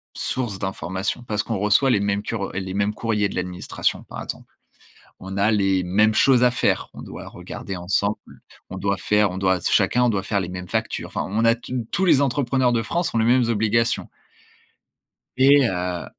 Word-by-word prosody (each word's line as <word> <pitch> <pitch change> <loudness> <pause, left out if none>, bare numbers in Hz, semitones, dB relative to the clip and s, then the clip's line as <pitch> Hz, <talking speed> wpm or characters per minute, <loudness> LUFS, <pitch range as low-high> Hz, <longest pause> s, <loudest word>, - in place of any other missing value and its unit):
sources 120 -6 -3
d'information. 95 +3 -3
Parce 105 0 -1
qu'on 115 - -3
reçoit 105 +7 +3
les 105 - +3
mêmes 100 0 -1
cur 110 -4 -3
les 95 0 -4
mêmes 100 +1 0
courriers 105 -3 0
de - - -8
l'administration, 90 -1 -2
par - - -7
exemple. - - -8 0.7
On 95 +1 -7
a 100 +2 +3
les 95 -2 +2
mêmes 105 +4 +3
choses 130 -2 +4
à 125 - +5
faire, 120 - 0
on - - -9
doit - - -9
regarder 95 - -7
ensemble, 100 +4 -2 0.3
on - - -6
doit 100 0 0
faire 105 -2 +2
on 90 - -5
doit 95 -1 +2
s - - -2
chacun 125 0 +3
doit 100 -3 -1
faire 100 -2 0
les 90 - -4
mêmes 90 -1 -7
factures. - - -2
Enfin, - - -3
on 110 +3 0
a 115 0 +5
tu 120 -1 -5
tous 190 - +1
les 150 -5 +5
entrepreneurs 130 -2 +1
de 115 -1 +1
France 170 +5 -2
ont - - +2
les 110 - +2
mêmes 120 0 +3
obligations. 115 +1 +1 1.3
Et 135 -1 +6
heu 90 -2 -3
105 Hz, 195 wpm, -22 LUFS, 95-120 Hz, 1.3 s, Et